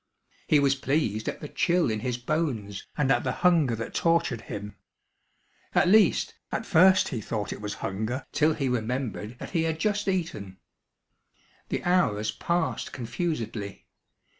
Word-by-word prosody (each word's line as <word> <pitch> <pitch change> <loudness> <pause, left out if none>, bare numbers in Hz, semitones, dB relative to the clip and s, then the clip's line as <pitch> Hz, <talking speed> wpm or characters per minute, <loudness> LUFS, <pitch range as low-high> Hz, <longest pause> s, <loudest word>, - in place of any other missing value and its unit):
He 150 - +5
was 140 -1 +4
pleased 135 -6 0
at - - -6
the 150 - -5
chill 175 -3 +1
in 110 - -1
his 125 +1 -2
bones 125 -8 -2
and 135 -3 +2
at - - +3
the 125 - 0
hunger 160 -9 +4
that 115 0 -6
tortured 165 -9 +1
him. 105 0 -6 1.0
At - - +4
least, 210 +3 +4 0.2
at - - -2
first 190 +2 +5
he 115 - -3
thought 105 -1 -3
it - - -9
was 105 -1 -4
hunger 110 +7 -3
till 155 +1 +2
he 140 -4 -1
remembered 125 -1 -2
that - - -8
he 170 - +1
had 160 -1 0
just 205 +2 0
eaten. 165 - -2 1.1
The - - -2
hours 110 - +2
passed 170 +8 -1
confusedly. 115 - -4
130 Hz, 155 wpm, -27 LUFS, 110-165 Hz, 1.1 s, He